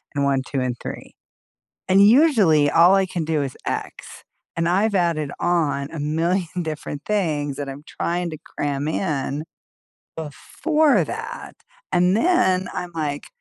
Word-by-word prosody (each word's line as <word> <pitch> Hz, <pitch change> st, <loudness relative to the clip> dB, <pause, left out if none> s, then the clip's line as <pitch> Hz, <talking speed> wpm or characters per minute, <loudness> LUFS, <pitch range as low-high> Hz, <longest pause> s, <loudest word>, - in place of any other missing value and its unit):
and 140 Hz, -1 st, +1 dB
1, 135 Hz, -1 st, +2 dB
2, 135 Hz, -, -3 dB
and 125 Hz, -1 st, -1 dB
3." -, -, -8 dB, 0.7 s
And, 190 Hz, +1 st, +4 dB
usually, 215 Hz, -, +5 dB
all 175 Hz, +5 st, +6 dB
I 195 Hz, 0 st, +3 dB
can 175 Hz, -3 st, -3 dB
do 155 Hz, -2 st, 0 dB
is 135 Hz, -2 st, -4 dB
X, -, -, -5 dB, 0.3 s
and 165 Hz, -, 0 dB
I've 200 Hz, +4 st, +2 dB
added 165 Hz, -6 st, +1 dB
on 155 Hz, -5 st, 0 dB
a 165 Hz, -, -6 dB
million 170 Hz, +4 st, -1 dB
different 155 Hz, -2 st, -5 dB
things 150 Hz, -9 st, -1 dB
that 145 Hz, -1 st, -5 dB
I'm 135 Hz, +1 st, -8 dB
trying 175 Hz, 0 st, -2 dB
to 155 Hz, -, -7 dB
cram 145 Hz, 0 st, -3 dB
in 150 Hz, -3 st, -2 dB, 0.7 s
before 295 Hz, -, +1 dB
that, -, -, -7 dB, 0.4 s
and 180 Hz, +2 st, +3 dB
then 190 Hz, -, +2 dB
I'm 180 Hz, -1 st, -5 dB
like, 150 Hz, -3 st, -3 dB
165 Hz, 150 wpm, -22 LUFS, 145-185 Hz, 0.7 s, all